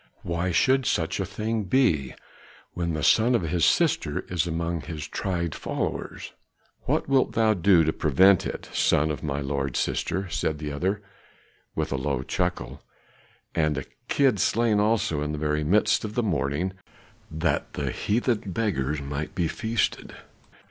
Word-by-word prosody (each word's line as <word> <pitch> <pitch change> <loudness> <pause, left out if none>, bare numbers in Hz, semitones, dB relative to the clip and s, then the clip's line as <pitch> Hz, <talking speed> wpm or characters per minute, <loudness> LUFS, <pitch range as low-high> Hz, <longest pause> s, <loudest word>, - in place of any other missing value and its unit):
Why 85 +1 -1
should 130 +9 +3
such 80 -1 0
a - - -1
thing 110 -1 -2
be, 85 - +2 0.6
when 85 -2 -2
the 75 - -3
son 115 +7 +4
of 115 - +1
his 85 0 0
sister - - +2
is 90 -1 0
among 85 0 -2
his 80 -4 -6
tried 85 -4 -2
followers?" - - -4 0.5
"What - - 0
wilt 135 -1 +2
thou 110 -1 +3
do 90 -2 +4
to 80 0 +1
prevent 95 +6 +4
it, - - -6
son 75 +2 +2
of 75 - -5
my 70 -2 -2
lord's 70 -1 -2
sister," 95 0 -1
said 80 -1 -1
the 75 -1 -5
other, 95 +8 -1 0.7
with - - -2
a 70 - 0
low 65 -1 -1
chuckle - - -2 0.7
"and 75 -3 +1
a - - -3 0.2
kid 135 -7 +2
slain 110 +2 +2
also, 105 -7 +1
in 75 +1 -2
the - - -3
very 75 0 0
midst 100 +5 +3
of 110 -1 -5
the 120 - +1
mourning, 80 -1 -1 0.6
that 80 +2 -1
the - - -2
heathen 115 +1 0
beggars 75 - -1
might 75 +5 -5
be 85 -3 +1
feasted!" 115 +4 -2
85 Hz, 160 wpm, -26 LUFS, 75-105 Hz, 0.7 s, son